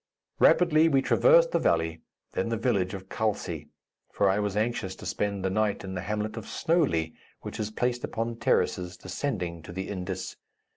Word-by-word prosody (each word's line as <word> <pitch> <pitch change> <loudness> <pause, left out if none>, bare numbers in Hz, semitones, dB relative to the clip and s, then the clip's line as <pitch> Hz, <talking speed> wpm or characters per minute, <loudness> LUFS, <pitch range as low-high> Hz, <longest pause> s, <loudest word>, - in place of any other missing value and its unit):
Rapidly 165 -2 +5
we 135 -3 +3
traversed - - +5
the - - +2
valley, 80 0 +1 0.3
then 105 - -1
the 115 - 0
village 100 -5 0
of 95 0 -9
Khalsi, 110 +1 -2 0.4
for 100 -1 +3
I 100 - +1
was 105 -1 -1
anxious 110 -4 -1
to - - -11
spend 100 -2 -2
the 95 - +1
night 110 +1 0
in 95 -1 -6
the 90 - -3
hamlet 105 +3 -3
of 110 - -5
Snowely, 140 - +1 0.3
which - - -7
is 105 -1 -1
placed 120 +2 -1
upon 115 +1 -3
terraces 90 -5 0
descending 90 - -3
to 80 - -10
the 95 +2 -5
Indus. 95 -1 -4
105 Hz, 180 wpm, -28 LUFS, 95-120 Hz, 0.4 s, Rapidly